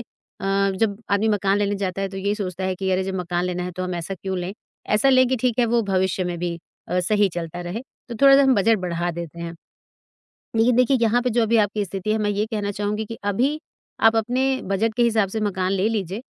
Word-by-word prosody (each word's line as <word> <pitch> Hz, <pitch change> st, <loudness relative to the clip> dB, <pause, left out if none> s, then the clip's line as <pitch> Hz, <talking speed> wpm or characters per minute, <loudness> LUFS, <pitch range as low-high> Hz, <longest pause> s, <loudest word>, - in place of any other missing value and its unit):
अ, 195 Hz, -3 st, -2 dB
जब 205 Hz, -1 st, 0 dB
आदमी 200 Hz, +2 st, +2 dB
मकान 200 Hz, -1 st, +2 dB
लेने 205 Hz, 0 st, 0 dB
जाता 195 Hz, -1 st, -3 dB
है 195 Hz, -, -1 dB
तो 195 Hz, -, -9 dB
ये 200 Hz, +2 st, 0 dB
सोचता 190 Hz, -3 st, -4 dB
है 185 Hz, 0 st, 0 dB
कि 190 Hz, +1 st, -2 dB
अरे 185 Hz, 0 st, +1 dB
जब 190 Hz, 0 st, -3 dB
मकान 175 Hz, -1 st, -2 dB
लेना 180 Hz, 0 st, -2 dB
है 180 Hz, -, -4 dB
तो 185 Hz, -, -5 dB
हम 180 Hz, 0 st, -3 dB
ऐसा 170 Hz, +3 st, -4 dB
क्यों 190 Hz, 0 st, -4 dB
लें? 180 Hz, +2 st, -4 dB, 0.3 s
ऐसा 210 Hz, +6 st, +3 dB
लें 255 Hz, -1 st, +5 dB
कि 260 Hz, -, +1 dB
ठीक 250 Hz, -1 st, 0 dB
है, 240 Hz, -, +4 dB
वे 235 Hz, 0 st, +2 dB
भविष्य 190 Hz, -2 st, 0 dB
में 175 Hz, -1 st, -3 dB
भी 170 Hz, 0 st, -3 dB, 0.3 s
अ, 180 Hz, +1 st, +1 dB
सही 205 Hz, +2 st, +2 dB
चलता 175 Hz, 0 st, -5 dB
रहें, 175 Hz, +6 st, -4 dB, 0.3 s
तो 240 Hz, -, -5 dB
थोड़ा-सा 275 Hz, 0 st, +8 dB
हम 265 Hz, -1 st, +4 dB
बजट 220 Hz, +1 st, +3 dB
बढ़ा 175 Hz, -1 st, -2 dB
देते 170 Hz, -1 st, -7 dB
हैं। 170 Hz, 0 st, -5 dB, 1.0 s
लेकिन 230 Hz, +2 st, +4 dB
देखिए, 255 Hz, +2 st, +4 dB
यहाँ 230 Hz, +1 st, +3 dB
पे 250 Hz, -, 0 dB
जो 235 Hz, +1 st, +2 dB
अभी 225 Hz, +1 st, +2 dB
आपकी 210 Hz, 0 st, +1 dB
स्थिति 195 Hz, +2 st, -3 dB
है 220 Hz, -, +1 dB
मैं 210 Hz, -1 st, 0 dB
ये 205 Hz, +1 st, 0 dB
कहना 210 Hz, -3 st, -3 dB
चाहूँगी 210 Hz, +2 st, -2 dB
कि 225 Hz, +1 st, -8 dB
अभी 265 Hz, +9 st, +1 dB, 0.5 s
आप 225 Hz, -, 0 dB
अपने 245 Hz, +4 st, 0 dB, 0.2 s
बजट 205 Hz, +4 st, 0 dB
के 240 Hz, -, +2 dB
हिसाब 220 Hz, -4 st, +2 dB
से 220 Hz, +3 st, -3 dB
मकान 190 Hz, -3 st, -1 dB
ले 195 Hz, +2 st, +1 dB
लीजिए 205 Hz, -1 st, -3 dB
200 Hz, 240 wpm, -23 LUFS, 185-225 Hz, 1.0 s, थोड़ा-सा